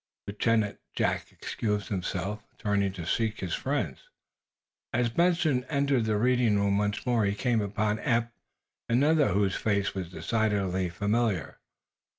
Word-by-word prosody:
Lieutenant 105 0 0 0.2
Jack - - 0
excused 105 -2 -3
himself, 95 +1 -3 0.2
turning 100 -2 +1
to 90 -4 -6
seek 110 +3 0
his 90 -3 -3
friends. - - -2 0.8
As 120 0 +1
Benson 165 -4 +2
entered 140 -5 +1
the 110 -1 +1
reading 120 -2 +3
room 100 0 +2
once 105 +3 -1
more 120 -3 +2
he 100 0 +1
came 120 0 +1
upon 105 +1 -1
Eph 115 0 +1 0.6
and 120 +4 +3
another 155 -1 +4
whose 100 0 +1
face 100 -2 0
was 95 -3 -4
decidedly 95 -2 0
familiar. 100 -1 -1
105 Hz, 140 wpm, -28 LUFS, 100-120 Hz, 0.8 s, another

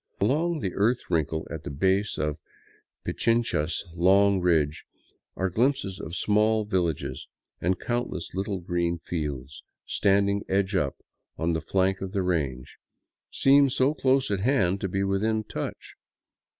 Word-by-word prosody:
Along 155 - +1
the 95 - -2
earth 115 +1 0
wrinkle 80 -1 0
at 80 -2 -6
the - - -5
base 95 +8 +1
of 75 -1 -2 0.7
Pichincha's 115 -9 0
long 95 +3 +4
ridge 80 -4 +1 0.5
are 95 0 -1
glimpses 115 -3 0
of 85 -2 -6
small 110 +2 +2
villages, 90 -7 -2 0.3
and 90 +1 +1
countless 120 -7 -3
little 95 0 -2
green 85 0 -1
fields, 75 -6 -5 0.2
standing 100 0 +2
edge 95 +1 +1
up 75 -7 0 0.4
on 85 +1 0
the 80 - -1
flank 95 0 0
of 95 0 -5
the 100 -2 0
range, 70 -8 -2 0.5
seem 140 0 +5
so 130 +2 +2
close 135 -3 +1
at 100 - 0
hand 100 -5 +2
as - - -16
to 95 - -2
be 95 +2 -1
almost 95 - 0
within 110 0 +1
touch. - - -6
95 Hz, 150 wpm, -26 LUFS, 85-110 Hz, 0.7 s, seem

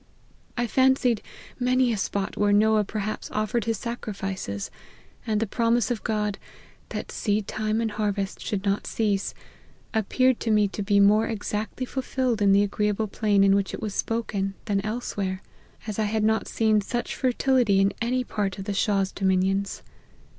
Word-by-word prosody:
I 240 - +1
fancied 260 -1 +3 0.4
many 250 -1 +3
a - - 0
spot 195 0 -2
where 205 0 +2
Noah 215 +1 +4
perhaps 215 +1 -4
offered 215 +1 -1
his 225 -2 0
sacrifices; 195 - -4 0.6
and 215 -1 +1
the 225 - +1
promise 230 +2 +1
of 235 - -2
God, 210 -2 -1 0.2
' - - -28
that - - -5
seed 205 -1 -1
time 215 0 -1
and 225 -1 -1
harvest 205 -2 -2
should 205 -1 -3
not 200 0 0
cease,' 205 -3 0 0.6
appeared 250 +3 +2
to 230 - -2
me 210 -1 +4
to 205 - -5
be 200 0 +3
more 210 +2 +5
exactly 215 +2 -3
fulfilled 255 -3 -1
in 200 -1 +5
the 200 +1 +5
agreeable 210 +1 0
plain 205 -1 +2
in 195 0 +5
which 200 -1 0
it - - -9
was 210 -2 -4
spoken, 200 -4 -2
than 200 -2 0
elsewhere; 200 -3 -3 0.4
as 215 -1 -4
I 215 - +2
had 215 +1 0
not 220 +1 +2
seen 215 -2 +2
such 240 +4 -3
fertility 250 -5 +2
in 195 0 +3
any 250 +2 +1
part 205 -5 -2
of 195 - -6
the 205 - -2
Shah's 195 -1 +1
dominions. 195 +1 0
210 Hz, 170 wpm, -25 LUFS, 200-230 Hz, 0.6 s, more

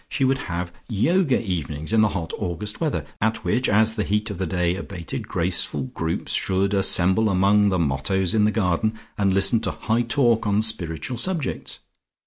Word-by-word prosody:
She 140 -6 0
would 135 +1 +1
have 85 +1 -3 0.2
Yoga 140 - +2
evenings 80 - -4
in 110 - +4
the 110 - +4
hot 90 -5 -4
August 100 - -4
weather, 145 - -1 0.2
at 110 +1 0
which, 125 +9 +1
as 110 +2 +4
the 110 -2 -2
heat 105 +2 -1
of 100 - -7
the 95 - -1
day 90 -1 0
abated, 90 -3 -6
graceful 95 +9 -1
groups 80 0 -2
should 95 +1 +1
assemble 95 +2 +3
among 100 +2 +3
the 95 - 0
mottos 85 +5 0
in 105 -1 +3
the 105 - +2
garden 105 +1 0 0.2
and 100 -2 +1
listen 100 +4 +4
to - - -2
high 115 +2 -1
talk 120 -2 +2
on 105 +1 +2
spiritual 90 - +1
subjects. 170 -2 -2
100 Hz, 180 wpm, -23 LUFS, 90-110 Hz, 0.2 s, in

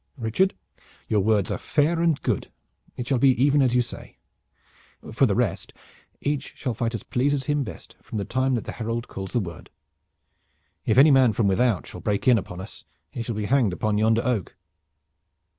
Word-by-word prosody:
"Richard, 125 - +1 0.5
your 105 - +2
words 105 -1 +2
are - - -2
fair 160 +3 +1
and 165 -4 +2
good. - - -1 0.5
It 125 - -4
shall 130 -3 +1
be 130 -2 +4
even 145 +2 +4
as 125 -2 +2
you 125 - +4
say. 120 - -10 1.0
For - - +4
the - - 0
rest, - - -1 0.5
each 145 -1 -3
shall 125 -4 -3
fight 115 +1 -2
as 115 - -6
pleases 140 +2 0
him 145 -1 0
best 100 -9 -10
from 110 - -7
the 100 - -2
time 130 +1 0
that 115 - -2
the - - -6
herald 115 +1 -4
calls 95 -1 -7
the 120 - +2
word. 85 -6 -7 1.2
If - - +2
any 145 +3 +8
man 130 -4 +5
from 110 - +1
without 105 +1 +1
shall 90 - -9
break 105 +3 -1
in 120 -3 +6
upon 90 -1 -8
us 95 - -10 0.3
he 120 - -5
shall 115 -1 -4
be 105 0 -2
hanged 120 -7 +2
on 105 -1 +2
yonder 110 +1 +3
oak." 120 -8 -1
120 Hz, 195 wpm, -24 LUFS, 110-135 Hz, 1.2 s, any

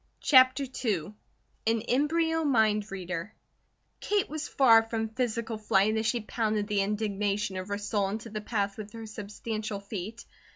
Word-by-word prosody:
CHAPTER 260 0 +6 0.2
II 200 -5 -1 0.5
AN 225 0 +2
EMBRYO 320 +7 +1
MIND 220 -6 +2
READER 180 0 -5 0.6
KATE 410 -1 0
was 310 0 -4
far 230 -5 +6
from 225 0 -3
physical 230 -1 -2
flight 210 0 +2
as 220 0 0
she 235 0 +1
pounded 215 -1 -1
the 205 -1 +1
indignation 205 0 -1
of 185 0 -4
her 205 0 -2
soul 205 -1 -1
into 220 +2 -5
the 215 0 -4
path 205 -2 -2
with 210 0 -8
her 225 -1 -7
substantial 215 0 -5
feet. 205 +3 -7
215 Hz, 155 wpm, -29 LUFS, 205-230 Hz, 0.6 s, CHAPTER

